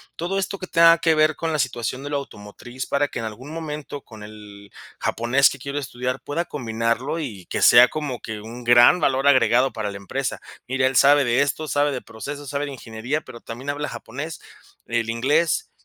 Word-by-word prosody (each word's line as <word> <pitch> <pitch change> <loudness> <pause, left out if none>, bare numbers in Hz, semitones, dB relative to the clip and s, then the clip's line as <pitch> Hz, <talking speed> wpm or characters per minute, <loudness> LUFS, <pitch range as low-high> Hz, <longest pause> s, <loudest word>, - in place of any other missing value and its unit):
todo 180 +4 -2
esto 195 +1 -3
que 185 - -5
tenga 165 -1 +6
que 165 -1 +3
ver 155 0 +3
con 165 +2 -3
la 155 - -1
situación 125 +1 -2
de 145 - -5
lo 145 - 0
automotriz, 120 0 -8
para 140 +1 +1
que 125 - -6
en 115 - -4
algún 115 +7 -8
momento 150 -3 -6
con 110 -4 -13
el 105 -1 -12 0.3
japonés 120 +4 +3
que 140 - -8
quiero 140 +3 -4
estudiar 125 -2 -4
pueda 165 +4 -3
combinarlo 115 +2 -2
y 105 - -6
que - - -3
sea 120 +1 +8
como 145 -5 -4
que 110 -2 -6
un 115 +3 -9
gran 120 +7 +6
valor 135 -3 +1
agregado 130 -2 +4
para 110 -2 -3
la 100 - -7
empresa: 130 +7 -4 0.3
"Mire, 130 +1 +1
él 130 - -2
sabe 145 +2 +6
de 120 +2 +2
esto, 145 +2 -1
sabe 145 +2 +1
de 130 -3 -4
proceso, 140 +6 -8
sabe 145 +1 -2
de 140 - -6
ingeniería, 125 +4 -4
pero 120 - -12
también 120 +4 -8
habla 145 +1 -4
japonés, 140 +7 -7 0.5
el 115 -1 -1
inglés, 150 - +1
135 Hz, 205 wpm, -23 LUFS, 115-145 Hz, 0.5 s, sea